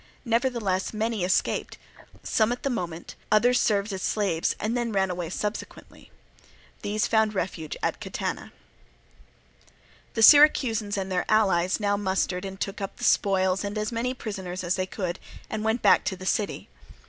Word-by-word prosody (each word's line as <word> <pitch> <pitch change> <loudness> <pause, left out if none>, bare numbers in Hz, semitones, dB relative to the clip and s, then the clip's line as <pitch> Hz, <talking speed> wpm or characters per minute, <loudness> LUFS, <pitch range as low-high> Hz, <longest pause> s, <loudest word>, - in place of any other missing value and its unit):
Nevertheless 230 -5 0
many 220 -2 -1
escaped, 185 - 0 0.5
some 220 +1 +1
at 245 - -4
the 275 - 0
moment, 175 -7 -5 0.2
others 245 +4 +4
served 205 0 +1
as 190 - -4
slaves, 190 -7 0
and 220 +3 -1
then 240 -1 -1
ran 190 -2 +1
away 175 -2 -4
subsequently. 210 +4 -6 0.7
These 210 +1 -1
found 220 -1 +2
refuge 165 -4 -3
at - - -1
Catana. - - -4 1.6
The 225 - +2
Syracusans 230 -7 +6
and 190 -1 -3
their 180 - 0
allies 190 -4 +2
now 205 -1 +1
mustered 190 -1 -1
and 195 0 -7
took 195 +1 -4
up 195 - -5
the - - -10
spoils 190 -1 +2
and 205 +1 -4
as 215 +1 -2
many 240 +2 -2
prisoners 190 -6 -5
as 175 0 0
they 185 0 -2
could, 185 -2 -4 0.3
and 215 -1 -3
went 220 +2 0
back - - +5
to 190 - -1
the 185 0 -10
city. 205 +2 -1
205 Hz, 160 wpm, -26 LUFS, 185-220 Hz, 1.6 s, Syracusans